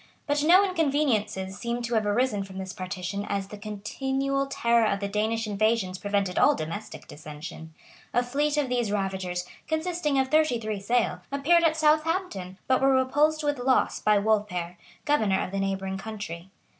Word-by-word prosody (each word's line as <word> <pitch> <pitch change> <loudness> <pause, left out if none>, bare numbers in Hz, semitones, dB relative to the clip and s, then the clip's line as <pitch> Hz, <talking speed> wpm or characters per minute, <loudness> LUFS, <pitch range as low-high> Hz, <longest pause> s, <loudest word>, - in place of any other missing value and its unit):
But 290 -1 +1
no 365 +5 +6
inconveniences 270 - 0
seem 240 0 -3
to 235 0 -3
have 215 -2 +1
arisen 210 -1 +1
from 190 -1 -10
this 190 0 -5
partition 185 +2 -4
as 200 -1 -2
the - - -7
continual 265 +7 -2
terror 235 -4 +2
of 200 - -1
the 200 - -2
Danish 220 +3 -1
invasions 210 -3 0
prevented 200 -3 0
all - - +5
domestic 165 +7 -6
dissension. 155 +1 -9 0.4
A 245 - +2
fleet 290 +4 0
of 290 -2 +1
these 240 -4 0
ravagers, 190 -3 -2 0.2
consisting 315 -2 -1
of 265 -1 +2
thirty 310 -5 +3
three 215 -2 -3
sail, 200 -3 0
appeared 315 +5 +3
at 320 -1 +3
Southampton, 310 - +1
but 260 0 +2
were 270 0 +4
repulsed 295 +4 +2
with 290 -2 0
loss 255 +1 +2
by 210 -1 +3
Wolfhere, 200 -5 0 0.3
governor 220 -11 +2
of - - -3
the 195 - -2
neighboring 195 0 -2
country. 195 -5 -7
220 Hz, 170 wpm, -27 LUFS, 195-275 Hz, 0.4 s, no